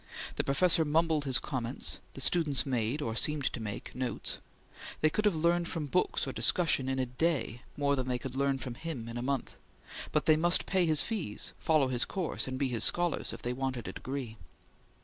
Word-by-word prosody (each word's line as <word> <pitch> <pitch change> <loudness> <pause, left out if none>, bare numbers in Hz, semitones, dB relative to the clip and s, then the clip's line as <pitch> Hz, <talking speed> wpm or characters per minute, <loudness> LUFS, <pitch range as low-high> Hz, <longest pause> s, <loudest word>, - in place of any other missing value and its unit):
The - - +1
professor 165 +4 +3
mumbled 155 0 +1
his 130 -2 +4
comments; 130 -2 -3 0.2
the 135 - -5
students 150 -2 +3
made, 130 +2 -1
or 110 -1 -3
seemed 150 +2 0
to - - -4
make, 105 -2 -6
notes; 130 -1 -3 0.6
they 155 - +3
could 215 +6 0
have 205 -5 +3
learned 170 +2 +2
from 160 -4 -3
books 180 +6 0
or - - -4
discussion 150 -7 +3
in 135 - -1
a 130 - +1
day 125 -3 -1 0.2
more 140 -1 +2
than 130 -2 -2
they 125 -1 0
could 125 +1 -7
learn 140 0 +1
from 130 -2 -6
him 135 -4 -6
in 115 - -7
a - - -3
month, 135 +1 -2 0.5
but 150 - +1
they 155 - +6
must 175 +2 +5
pay 185 -3 +2
his 155 -2 +4
fees, 195 - -3
follow 155 -4 +3
his 125 -2 +1
course, 185 -7 -2
and 130 0 -3
be 135 - +1
his 115 -4 0
scholars, 175 +5 +2
if - - -9
they 120 - -1
wanted 130 -2 -3
a - - -5
degree. 130 -4 -5
140 Hz, 210 wpm, -31 LUFS, 125-160 Hz, 0.6 s, they